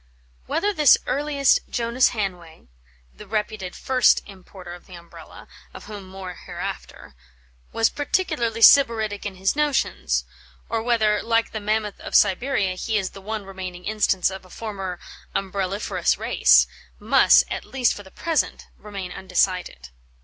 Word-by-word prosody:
Whether 410 +4 0
this 300 -6 +6
earliest 285 -1 +2
Jonas 235 +2 +2
Hanway 180 -7 -5 0.5
(the 210 - -13
reputed 210 -3 -3
first 255 -2 +3
importer 185 -2 -12
of 175 - -13
the 185 - -11
Umbrella, 170 0 -13 0.3
of - - -10
whom 205 -3 -9
more 190 -1 -8
hereafter) - - -7 0.6
was 225 - +2
peculiarly 290 -7 -1
sybaritic 220 -7 +5
in 195 - -8
his 190 +5 0
notions, 295 -1 0 0.4
or 225 -1 -1
whether, 220 -3 +1
like 230 0 0
the 215 - -4
mammoth 210 0 -2
of - - -6
Siberia, 205 -1 +2
he 215 +4 -2
is 190 -3 -2
the 195 - -12
one 215 0 -5
remaining 185 -2 -8
instance 205 -3 +1
of 190 0 -8
a 185 - -18
former 195 -4 -6 0.4
"umbrelliferous" 195 +1 -1
race, - - +4 0.3
must, - - +5
at - - -3
least 255 -3 0
for - - -9
the 190 - -15
present, 325 - -2
remain 195 -3 -7
undecided. 180 - -1
210 Hz, 140 wpm, -23 LUFS, 190-230 Hz, 0.6 s, this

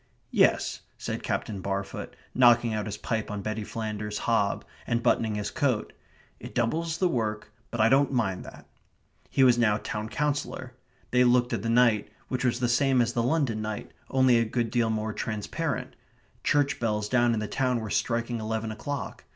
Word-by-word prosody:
"Yes," - - +3 0.2
said - - -4
Captain 100 -3 -3
Barfoot, 100 +1 -4 0.2
knocking 120 -2 +5
out 105 0 -2
his 105 0 -4
pipe 110 -2 -2
on 100 -1 -4
Betty 110 +1 -3
Flanders's 105 -1 -4
hob, 105 -4 +1 0.2
and 120 0 0
buttoning 110 -2 +2
his 105 -1 -3
coat. 130 -7 0 0.5
"It - - -10
doubles 160 +8 0
the 185 - +3
work, 110 -8 -2 0.2
but 120 - -5
I 110 - +6
don't 135 +4 +4
mind 110 -8 0
that." - - -12 0.6
He 135 - +3
was 125 -2 +5
now 105 -3 +3
town 105 0 -4
councillor. 145 -2 -2 0.4
They 125 0 +5
looked 120 0 +3
at 115 - -1
the 115 - -2
night, 115 -3 +4 0.2
which 130 0 -2
was 120 -1 +1
the 120 - +2
same 130 +2 +3
as 120 0 +2
the 120 - +1
London 125 -4 +1
night, 110 -1 -5 0.2
only 130 -2 +4
a - - +3
good 115 0 -1
deal 120 -2 +2
more 110 0 -1
transparent. 105 -2 -3 0.5
Church 145 -1 +2
bells 105 -2 0
down 120 0 +3
in - - -1
the 105 - -3
town 125 -1 0
were 110 -2 -5
striking 115 +2 0
eleven 110 0 -2
o'clock. 130 +5 -5
115 Hz, 185 wpm, -27 LUFS, 110-125 Hz, 0.6 s, I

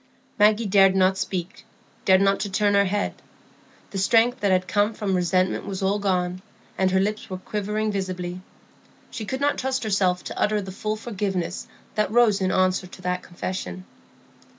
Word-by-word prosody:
Maggie 215 +2 +4
dared 195 -1 +5
not 190 0 +4
speak, 185 -2 -4 0.4
dared 190 0 +5
not 195 0 +3
turn 205 0 +1
her 200 0 +4
head. 205 +2 -1 0.8
The 195 - -3
strength 230 +5 +3
that 200 - +1
had 185 -1 +2
come 210 +1 +1
from 200 -3 -2
resentment 185 +1 +1
was 195 -1 -4
all 200 +2 +1
gone, 185 -2 -1 0.3
and 190 0 +2
her 190 0 +2
lips 210 +2 -2
were 185 - -4
quivering 210 +2 -2
visibly. 185 -2 -4 0.7
She 220 - -5
could 260 +5 -4
not 290 0 +1
trust 265 0 -1
herself 190 -4 +1
to - - -6
utter 210 0 +2
the 190 -2 -6
full 215 +3 -3
forgiveness 195 -5 -3 0.3
that 215 -1 0
rose 220 -4 +4
in 185 0 +1
answer 185 0 +1
to 185 - -13
that 180 0 -1
confession. 175 - -6
195 Hz, 175 wpm, -24 LUFS, 185-210 Hz, 0.8 s, dared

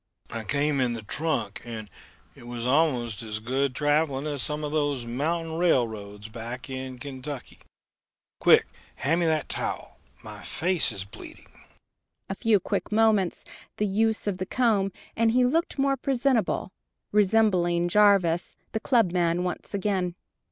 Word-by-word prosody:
"I 115 -1 -2
came 145 +5 +1
in 125 -2 +2
the 115 -2 -3
trunk 150 -3 -2
and 115 -3 -6 0.5
it 120 - -13
was 120 -1 -4
almost 125 -6 +2
as 110 -2 -4
good 130 +4 -1
traveling 145 -1 +1
as 145 -3 -1
some 150 0 -2
of 150 - -3
those 145 -5 0
mountain 160 +7 -2
railroads 110 -10 0
back 120 +4 -7
in 130 -1 -5
Kentucky. 135 0 -7 0.8
Quick, - - +6 0.3
hand 160 +6 +1
me 170 - +2
that 155 -2 +1
towel - - -4 0.2
my - - -9
face 180 -4 +1
is 100 -3 -5
bleeding." 100 - -12 0.8
A - - 0
few 210 +1 +3
quick - - -3
movements, 210 -4 +2 0.3
the 210 - +1
use 220 +2 +1
of 195 -3 -2
the 185 - -3
comb, 210 -6 +2 0.2
and 225 0 +3
he 250 0 +4
looked 325 +7 0
more 275 0 +2
presentable, 255 -6 0 0.4
resembling 190 -5 +3
Jarvis 190 -3 +3 0.2
the 220 - -1
clubman 180 -8 +2
once 180 +2 -4
again. 190 -3 -1
160 Hz, 145 wpm, -26 LUFS, 130-200 Hz, 0.8 s, Quick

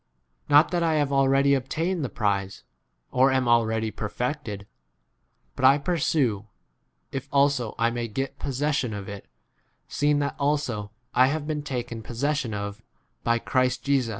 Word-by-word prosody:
Not 145 +3 +6
that 175 -1 0
I 165 -2 +2
have 145 -2 +1
already 135 +1 +4
obtained 160 +6 -1
[the 130 - -2
prize], 100 -3 -2 0.5
or 130 +2 +4
am 130 -2 +1
already 110 -2 +2
perfected; 105 -1 -4 0.9
but - - -6
I 135 +2 +7
pursue, 140 - 0 0.6
if 135 - -5
also 140 -5 +2
I 115 +1 +2
may 120 0 -3
get 135 +5 -4
posses 145 +2 -1
sion 120 -7 -2
[of 100 -2 -7
it], 100 -1 -8 0.6
seeing 145 0 +1
that 145 -1 -1
also 140 -6 0
1 105 - -10 0.2
I 130 +1 +5
have 150 +2 -2
been 150 -1 -2
taken 120 -5 -4
possession 130 +2 -2
of 100 0 -5 0.4
by 115 0 +2
13 - - -11
Christ 130 -1 +1
Jesus. 135 -4 +1
130 Hz, 160 wpm, -25 LUFS, 115-145 Hz, 0.9 s, I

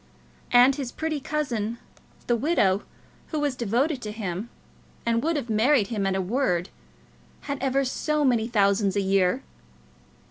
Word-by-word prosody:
And 250 +3 +6
his 265 -4 -4
pretty 315 -2 -2
cousin, 240 -7 -2 0.5
the 240 - +2
widow, 220 - +2 0.5
who 310 - -3
was 290 -3 0
devoted 250 +5 0
to 210 - -5
him, 210 0 -4 0.6
and 230 0 +2
would 330 +4 0
have 280 -5 -2
married 225 0 +3
him 205 -4 -1
at 190 - 0
a 190 - 0
word, 180 -5 0 0.7
had 280 -2 -5
ever 270 0 +1
so 300 +3 0
many 235 -4 +2
thousands 200 -3 +2
a 200 - +2
year! 190 -2 +2
235 Hz, 150 wpm, -25 LUFS, 200-275 Hz, 0.7 s, And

